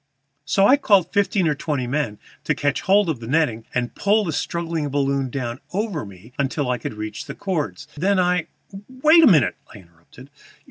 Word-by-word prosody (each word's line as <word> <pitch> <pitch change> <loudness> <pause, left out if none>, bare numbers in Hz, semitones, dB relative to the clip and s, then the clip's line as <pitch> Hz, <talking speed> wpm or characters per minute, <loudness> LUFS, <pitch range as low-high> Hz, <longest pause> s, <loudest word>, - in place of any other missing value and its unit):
So 195 +6 +3
I 270 +7 +6
called 200 - +3
fifteen 200 -3 +2
or 150 - +2
twenty 145 -3 -3
men 125 -5 -2 0.3
to - - +1
catch 145 -1 -1
hold 200 0 +3
of 155 -7 -2
the 115 - -8
netting 130 -6 0
and 120 -2 -2
pull 210 +2 +2
the 165 - -2
struggling 165 -2 -2
balloon 140 -1 0
down 120 -1 -4
over 195 - -2
me 100 +5 -15
until 140 -1 -1
I 125 - -1
could 110 - -6
reach 110 +5 -6
the 140 - -8
cords. 155 -6 -3
Then 190 +6 +1
I 180 -2 +1 0.2
" 195 +1 -11 0.2
"Wait 315 +2 +7
a - - +8
minute," 150 - +4
I - - -11
interrupted. 90 +9 -17
145 Hz, 195 wpm, -22 LUFS, 125-185 Hz, 0.3 s, a